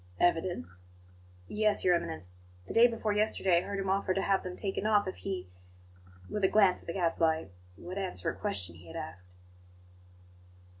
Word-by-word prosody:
"Evidence?" 165 - +1 0.7
"Yes, 215 0 +1
Your 180 - +6
Eminence; 160 - -3 0.3
the - - -6
day 235 +1 +8
before 225 -3 -1
yesterday 205 -4 +3
I - - -3
heard 200 +2 -4
him 195 0 -2
offer 190 -1 +1
to 195 - +1
have 195 -1 +2
them 180 -1 -6
taken 200 +1 -2
off 210 -2 +3
if 185 - -4
he" 190 - -4 0.8
with 210 - -3
a - - +7
glance 195 -2 +4
at - - -18
the 170 - -3
Gadfly 165 - +1 0.3
"would 185 +3 -6
answer 190 -2 -3
a - - -10
question 90 - -1
he 85 +1 -15
had 80 - -10
asked." 90 +2 -7
185 Hz, 180 wpm, -31 LUFS, 165-200 Hz, 0.8 s, day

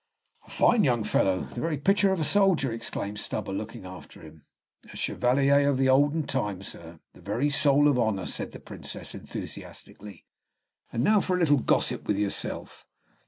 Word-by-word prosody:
"A - - -18
fine 225 -4 +3
young 120 -6 +2
fellow, 95 -2 +1
the 120 - -7
very 165 -2 -1
picture 195 +6 +3
of 190 - 0
a - - 0
soldier," 180 - +3
exclaimed 105 -2 -4
Stubber, 105 -1 -3
looking 105 -1 -6
after 90 -2 -11
him. 80 -1 -14 0.5
"A - - -12
chevalier 140 +3 +2
of 140 - +1
the 130 0 +2
olden 145 +4 +3
time, 105 -9 -3
sir, 85 -3 -8
the - - -17
very 120 +9 -1
soul 145 0 +4
of 140 -4 +3
honor," 110 -5 0
said - - -4
the - - -10
Princess, - - -8
enthusiastically. 100 -4 -8 0.7
"And 115 - -1
now 210 +5 +4
for 185 - 0
a - - -1
little 145 -5 +4
gossip - - 0
with 105 - +1
yourself." 100 -1 -3
130 Hz, 175 wpm, -27 LUFS, 105-145 Hz, 0.7 s, soul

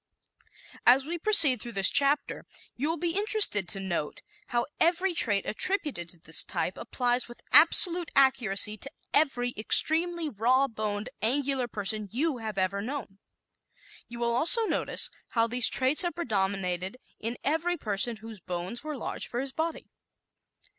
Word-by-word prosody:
As 260 +2 +4
we 340 +3 -6
proceed 315 - +6
through 235 - -9
this 195 -2 +3
chapter 280 +1 -1 0.3
you 285 +5 -3
will 330 - -2
be 340 +1 -3
interested 405 - +3
to 195 +2 -2
note 175 -6 -5 0.2
how 240 -1 -2
every 350 +2 +1
trait 205 - 0
attributed 295 - -2
to 175 - -5
this - - +1
type - - -4
applies 245 -1 -3
with 240 - -15
absolute 350 -2 +5
accuracy 215 -6 +1
to 275 - -4 0.2
every 245 -5 +1
extremely 325 +9 +2
raw 255 +3 0
boned, 215 -1 -5
angular 265 +2 0
person 210 -1 -1
you 275 +2 -2
have 215 -3 -7
ever 195 +1 -2
known. 225 -4 -7 0.9
You 235 - -11
will 235 0 -2
also 445 - +6
notice - - 0 0.2
how 230 -1 +2
these 240 +1 +3
traits 260 +3 +4
have 350 -1 0
predominated 195 - -3 0.2
in 230 +2 -5
every 330 +4 -1
person 220 -1 0
whose 225 -2 -9
bones 180 - -6
were 305 -2 -6
large - - -6
for 240 - -5
his 270 +1 -3
body. 320 0 -5
245 Hz, 155 wpm, -27 LUFS, 210-310 Hz, 0.9 s, proceed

